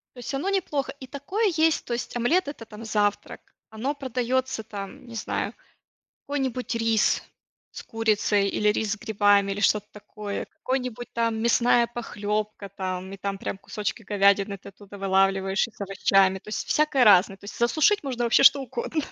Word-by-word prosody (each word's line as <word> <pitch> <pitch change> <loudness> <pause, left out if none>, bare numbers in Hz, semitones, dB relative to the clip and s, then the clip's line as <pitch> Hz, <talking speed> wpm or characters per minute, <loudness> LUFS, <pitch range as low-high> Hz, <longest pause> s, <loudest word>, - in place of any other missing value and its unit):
То 245 - -11
есть 245 +3 -6
оно 310 +9 -1
неплохо. 290 -8 -1
И 260 - -9
такое 375 - -1
есть, 320 0 +2
то 240 - -3
есть 240 - -4
омлет- 290 +8 +2
это 285 -6 -7
там 220 0 -11
завтрак. 205 -2 -1 0.3
Оно 245 +7 -3
продаётся 260 -2 -2
там, 200 +2 -8
не 235 - -10
знаю, 220 - -3 0.7
какой-нибудь 260 -4 -2
рис 225 -1 +2 0.5
с - - -8
курицей, 210 -2 +1
или 210 +1 +1
рис 215 -1 -1
с 220 - -1
грибами, 205 -2 +2
или 200 - -4
что-то 210 -1 +2
такое, 210 -1 -6
какой-нибудь 250 -2 -4
там, 230 -1 0
мясная 235 +1 +3
похлёбка 210 -3 -4
там, 185 0 -5
и - - -6
там 195 0 -4
прям 195 - -5
кусочки 210 +3 -4
говядины 200 -1 +2
ты 195 - -12
оттуда 200 0 -13
вылавливаешь, 195 +1 +2
и - - -15
с - - -25
овощами. 195 -1 +2
То 200 - -17
есть 215 - -3
всякое 300 -4 +3
разное, 195 -2 +6
то 200 - -19
есть 200 - -9
засушить 310 - +3
можно 250 -4 -2
вообще 235 - +4
что 280 +1 +7
угодно. 265 +4 -3
220 Hz, 175 wpm, -25 LUFS, 200-255 Hz, 0.7 s, что